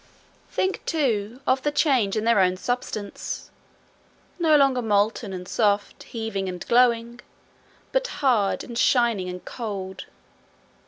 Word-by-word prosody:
Think, 380 0 -1
too, 245 -6 -1
of 260 +1 +2
the 295 - 0
change 260 -10 +2
in 215 - 0
their 230 -2 +4
own 185 -1 +3
substance 215 -2 -4 0.9
no 315 -3 +5
longer 270 -3 +3
molten 210 0 +1
and 180 -1 -6
soft, 205 -1 0
heaving 220 -5 -4
and 180 -1 -7
glowing, 235 -1 +3 0.7
but - - +1
hard 245 - +1
and 235 - -8
shining 230 -6 +2
and 180 0 -8
cold. 195 -5 -6
230 Hz, 125 wpm, -24 LUFS, 200-255 Hz, 0.9 s, no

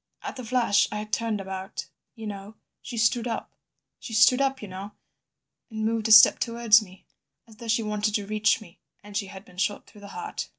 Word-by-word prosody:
"At - - -6
the 255 - -7
flash 225 -4 +2
I 210 - -3
had 210 0 -7
turned 225 -2 0
about... 190 +1 -6 0.3
"You 225 -2 -9
know—she 210 +4 -9
stood 230 +2 +2
up— 230 - -4 0.5
"She 225 - -7
stood 250 +4 +5
up, 270 -1 0
you 210 - -8
know, 195 +2 -8 0.8
and 220 -1 -4
moved 225 0 0
a - - 0
step 215 0 +9
towards 230 -2 +4
me—as 210 +3 -18
though 235 - -10
she 225 0 +1
wanted 210 0 -1
to 205 - -1
reach 215 +2 +1
me— 180 -5 -16 0.2
"And 205 0 -12
she 205 -1 -1
had 190 +1 -11
been 180 - -18
shot 195 +2 -1
through 210 - -17
the 200 - -10
heart." 430 - -6
215 Hz, 205 wpm, -26 LUFS, 205-230 Hz, 0.8 s, step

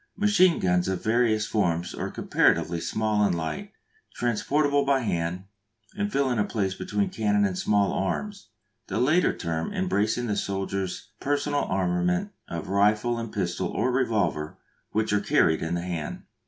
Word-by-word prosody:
Machine 190 -4 +4
guns 90 -1 +1
of 95 -2 -2
various 110 -1 +2
forms 85 -6 0
are - - -4
comparatively 85 0 +1
small 110 +1 0
and 100 - +2
light, 80 -2 -4 0.4
transportable 140 +5 +1
by 140 -1 +2
hand, 90 -4 -2 0.5
and 205 0 -2
filling 130 - +1
a - - +4
place 100 -3 -1
between 100 +1 -2
cannon 105 -2 +2
and 95 -2 -1
small 100 +1 +2
arms, 200 - -3 0.4
the 95 - -3
latter 155 +8 +3
term 80 -1 -3
embracing 120 - 0
the 105 -3 -1
soldier's 95 0 -3
personal 145 0 0
armament 90 -1 0 0.2
of 85 -1 -5
rifle 105 +4 +2
and 115 -2 -5
pistol 90 -3 -2
or 130 - 0
revolver, 105 - 0 0.3
which 110 -1 0
are 105 - +2
carried 80 -5 +3
in 80 +1 -1
the 85 - -2
hand. 85 -4 -4
105 Hz, 155 wpm, -26 LUFS, 90-120 Hz, 0.5 s, Machine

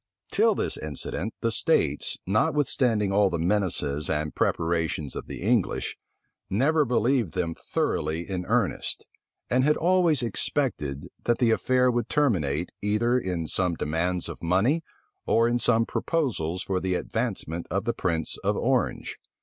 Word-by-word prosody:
Till - - +3
this - - -1
incident, 75 +7 -4
the 115 - +1
states, - - +2
notwithstanding 110 -1 +1
all 100 0 +4
the 85 - -2
menaces 85 -5 0
and 75 0 -1
preparations 80 -3 -1
of - - -6
the - - -7
English, 110 -2 +1 0.5
never 145 +9 +2
believed 120 - +1
them 85 -2 -1
thoroughly 80 +1 -2
in 95 -2 -3
earnest; - - 0 0.4
and 125 +1 +2
had 150 +2 +3
always 170 -5 +3
expected, 100 - -1 0.2
that 120 - +2
the 120 -3 +3
affair 125 +2 +3
would 120 0 -1
terminate, 90 - +1
either 115 +5 +2
in 90 -6 -3
some 90 +2 0
demands 85 +4 -1
of - - -8
money, 100 - +2 0.5
or 115 +1 +4
in 120 +1 +1
some 115 -1 +3
proposals 100 - -1
for 95 -1 -1
the 95 0 -1
advancement 95 -6 -3
of 100 +1 -1
the 120 - 0
prince 85 -7 -1
of - - 0
Orange. - - -1
100 Hz, 145 wpm, -26 LUFS, 85-120 Hz, 0.5 s, all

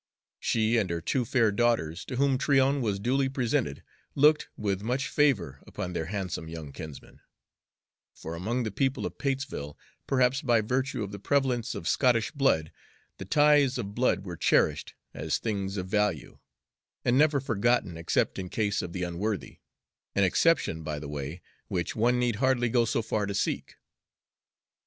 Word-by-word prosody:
She 110 +1 +1
and 100 -5 +1
her 85 0 -1
two 125 +9 -1
fair 115 -2 +3
daughters, 100 -7 +1
to 130 - -5
whom 135 0 +2
Tryon 140 -1 +3
was 105 -5 0
duly 130 +5 +1
presented, 115 - -1 0.3
looked 150 +2 +4
with 100 -2 -1
much 125 +6 -1
favor 125 - +1
upon 90 -1 -5
their 80 -2 -3
handsome 95 -4 -4
young 80 -3 -7
kinsman; 75 0 -10 1.0
for 80 - -7
among 110 +9 -2
the 110 - -3
people 135 +7 0
of - - -6
Patesville, 135 - -3 0.3
perhaps 130 0 +2
by 120 -5 +3
virtue 125 +2 -1
of 100 - -6
the 100 - -7
prevalence 130 0 0
of 85 - -5
Scottish 120 -4 +2
blood, 135 - +1 0.5
the 95 - -6
ties 145 +3 +4
of 100 -4 -4
blood 115 -4 +1
were 90 -2 -5
cherished - - +1 0.2
as - - -1
things 100 -3 -3
of 90 -1 -3
value, 105 - -1 0.7
and 120 - +3
never 145 +1 +4
forgotten 120 -6 +1
except 80 +3 0
in 90 -1 -5
case 105 0 0
of 85 - -6
the 90 - -3
unworthy 95 +4 -3 0.6
an 100 - +3
exception, 95 - +2
by 75 -1 -4
the 75 0 -6
way, 75 +4 -6 0.2
which 85 -2 -2
one 120 +3 +2
need 120 -3 0
hardly 125 -1 +2
go 120 0 +3
so 115 0 0
far 105 -1 -1
to 100 - -3
seek. - - -2
110 Hz, 165 wpm, -28 LUFS, 90-130 Hz, 1.0 s, looked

